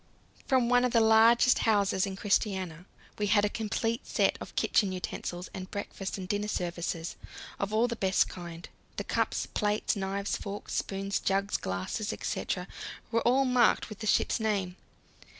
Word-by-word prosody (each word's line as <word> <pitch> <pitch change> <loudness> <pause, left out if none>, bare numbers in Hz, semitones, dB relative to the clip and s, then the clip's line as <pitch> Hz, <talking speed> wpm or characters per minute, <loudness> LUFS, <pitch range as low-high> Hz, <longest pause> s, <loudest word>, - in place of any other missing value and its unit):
From 260 -3 +3
one 245 0 +4
of 250 - +1
the 230 - +6
largest 225 +3 +6
houses 200 -3 +2
in 190 - -5
Christiania 190 -4 -1 0.3
we 205 - +1
had 205 0 +4
a - - +1
complete 225 +2 -2
set - - +2
of - - -9
kitchen 200 -3 +2
utensils 180 -1 -4
and 185 0 -6
breakfast 200 -1 -5
and 185 -1 -6
dinner 205 +2 -1
services, 170 -3 -3 0.4
all 215 +3 +1
of 245 - +2
the 235 - -2
best 190 -3 +2
kind. 170 -1 -8 0.3
The - - -2
cups, - - 0
plates, 210 0 0
knives, 195 0 -2
forks, 200 0 -6
spoons, 195 0 -1
jugs, 195 +1 0
glasses, 95 - -2
etc., - - -3 0.4
were 230 0 +2
all 260 +4 +3
marked 250 -3 +3
with 215 - -9
the 215 - -4
ship's - - +2
name. 200 -5 -1
205 Hz, 165 wpm, -29 LUFS, 190-225 Hz, 0.4 s, the